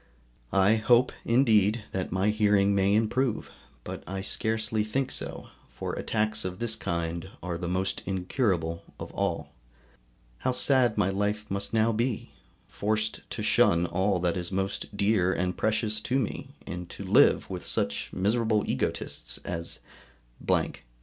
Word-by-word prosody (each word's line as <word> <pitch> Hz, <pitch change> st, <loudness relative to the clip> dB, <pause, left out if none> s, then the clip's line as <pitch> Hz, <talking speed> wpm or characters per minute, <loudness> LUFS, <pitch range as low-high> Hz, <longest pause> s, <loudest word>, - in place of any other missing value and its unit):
I 100 Hz, +3 st, +5 dB
hope 120 Hz, +3 st, +4 dB
indeed 115 Hz, -3 st, +3 dB
that 95 Hz, -1 st, -3 dB
my 95 Hz, +3 st, +1 dB
hearing 105 Hz, -2 st, +3 dB
may 100 Hz, +1 st, +3 dB
improve, 115 Hz, +2 st, 0 dB, 0.3 s
but -, -, -7 dB
I 95 Hz, +1 st, -4 dB
scarcely 110 Hz, +1 st, -1 dB
think 130 Hz, +5 st, -1 dB
so, -, -, -4 dB, 0.3 s
for -, -, -4 dB
attacks 110 Hz, -1 st, 0 dB
of 90 Hz, 0 st, -4 dB
this 115 Hz, 0 st, 0 dB
kind 85 Hz, +1 st, -3 dB
are 90 Hz, -1 st, -3 dB
the 85 Hz, +1 st, -4 dB
most 95 Hz, +2 st, -1 dB
incurable 90 Hz, -, -1 dB, 0.2 s
of -, -, -7 dB
all. -, -, -2 dB, 0.9 s
How 130 Hz, -, 0 dB
sad 125 Hz, -2 st, +5 dB
my 95 Hz, -, +3 dB
life 105 Hz, +2 st, -1 dB
must 100 Hz, 0 st, -2 dB
now 115 Hz, 0 st, +3 dB
be! 115 Hz, +1 st, -2 dB, 0.4 s
forced 105 Hz, +1 st, -2 dB
to 105 Hz, -, -4 dB
shun 105 Hz, -6 st, +4 dB
all 95 Hz, +3 st, +1 dB
that 90 Hz, +1 st, +1 dB
is 90 Hz, 0 st, -3 dB
most 95 Hz, +2 st, -3 dB
dear 100 Hz, -3 st, +2 dB
and 90 Hz, -1 st, -1 dB
precious 110 Hz, 0 st, 0 dB
to 125 Hz, +4 st, 0 dB
me, 130 Hz, -6 st, -3 dB
and 90 Hz, 0 st, -6 dB
to -, -, -8 dB
live -, -, +4 dB
with -, -, -6 dB
such 70 Hz, 0 st, -1 dB
miserable 110 Hz, +2 st, +1 dB
egotists -, -, -3 dB
as, 85 Hz, 0 st, -5 dB, 0.7 s
&c. -, -, +2 dB
105 Hz, 150 wpm, -28 LUFS, 95-110 Hz, 0.9 s, I